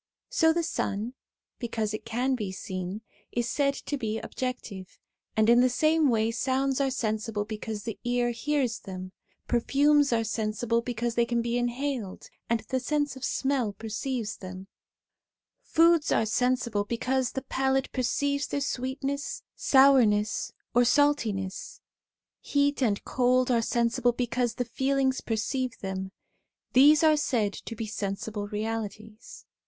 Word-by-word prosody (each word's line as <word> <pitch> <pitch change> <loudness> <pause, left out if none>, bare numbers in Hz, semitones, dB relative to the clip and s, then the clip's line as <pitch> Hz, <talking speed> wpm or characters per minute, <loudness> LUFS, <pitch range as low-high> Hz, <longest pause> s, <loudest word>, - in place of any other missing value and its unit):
So 325 -10 +4
the 340 +1 0
sun, 225 -7 -2 0.5
because 225 -3 -2
it 215 +1 -5
can 245 +4 0
be 210 -7 -2
seen, 185 +1 -5 0.3
is 240 0 -1
said 275 +1 +1
to 285 0 -4
be 220 -2 -2
objective; 225 -8 -5 0.4
and 220 0 +4
in 240 +1 +6
the 255 - +4
same 310 +3 +3
way 225 -1 +2
sounds 265 +2 0
are 275 - +2
sensible 220 -3 -2
because 215 -1 -5
the 225 - -5
ear 245 0 +1
hears 255 -1 -1
them; 185 -1 -8 0.4
perfumes 285 +4 +3
are 230 -1 +2
sensible 220 +1 -1
because 235 0 -2
they 235 0 +2
can 235 -1 0
be 235 0 -1
inhaled 245 -3 -3 0.2
and 230 -1 +1
the 260 - -2
sense 290 +1 -1
of 265 - -10
smell 265 -6 0
perceives 220 +1 -4
them; 185 0 -8 1.0
foods 335 -7 +3
are 220 - +3
sensible 235 -2 +1
because 250 +3 -1
the 265 - -3
palate 265 0 0
perceives 280 +3 0
their 285 - -2
sweetness, 275 +1 -3
sourness, 240 -6 +4 0.2
or 245 +1 +5
saltness; 235 -8 +1 0.6
heat 285 0 +1
and 210 -5 +1
cold 255 0 +2
are 235 -1 +3
sensible 240 +1 +1
because 240 -1 -1
the 245 - -2
feelings 265 +2 0
perceive 245 +2 -2
them. 190 -1 -4 0.6
These 295 +5 +7
are 310 -1 +5
said 225 -8 0
to 230 - -7
be 225 0 -4
sensible 205 0 -4
realities. 215 +1 -5
240 Hz, 140 wpm, -28 LUFS, 220-270 Hz, 1.0 s, These